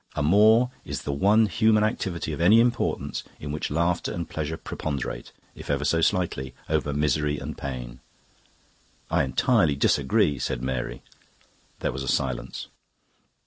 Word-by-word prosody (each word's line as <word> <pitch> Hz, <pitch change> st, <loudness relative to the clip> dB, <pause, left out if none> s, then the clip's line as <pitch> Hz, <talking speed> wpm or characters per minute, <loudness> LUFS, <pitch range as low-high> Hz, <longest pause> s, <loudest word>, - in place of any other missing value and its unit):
Amour 110 Hz, -, +4 dB
is -, -, -5 dB
the 70 Hz, -, -2 dB
one 105 Hz, +9 st, +4 dB
human 110 Hz, +1 st, +3 dB
activity 90 Hz, -7 st, -2 dB
of 75 Hz, -, -4 dB
any 105 Hz, +7 st, +6 dB
importance 120 Hz, +1 st, 0 dB, 0.2 s
in 75 Hz, -, -5 dB
which 75 Hz, -, -3 dB
laughter 85 Hz, +3 st, 0 dB
and 85 Hz, -2 st, -4 dB
pleasure 80 Hz, +1 st, -4 dB
preponderate, 70 Hz, -7 st, -5 dB, 0.2 s
if -, -, -11 dB
ever -, -, 0 dB
so 80 Hz, -, +2 dB
slightly, 80 Hz, -9 st, 0 dB
over 75 Hz, -2 st, 0 dB
misery 75 Hz, 0 st, 0 dB
and -, -, -6 dB
pain." 60 Hz, -3 st, -6 dB, 1.1 s
"I -, -, +3 dB
entirely 100 Hz, -, +2 dB
disagree," 70 Hz, 0 st, +2 dB
said 60 Hz, 0 st, -3 dB
Mary. 65 Hz, -1 st, -3 dB, 0.8 s
There -, -, 0 dB
was 65 Hz, -, -5 dB
a 70 Hz, -, -5 dB
silence. 65 Hz, -2 st, -2 dB
75 Hz, 145 wpm, -25 LUFS, 70-95 Hz, 1.1 s, any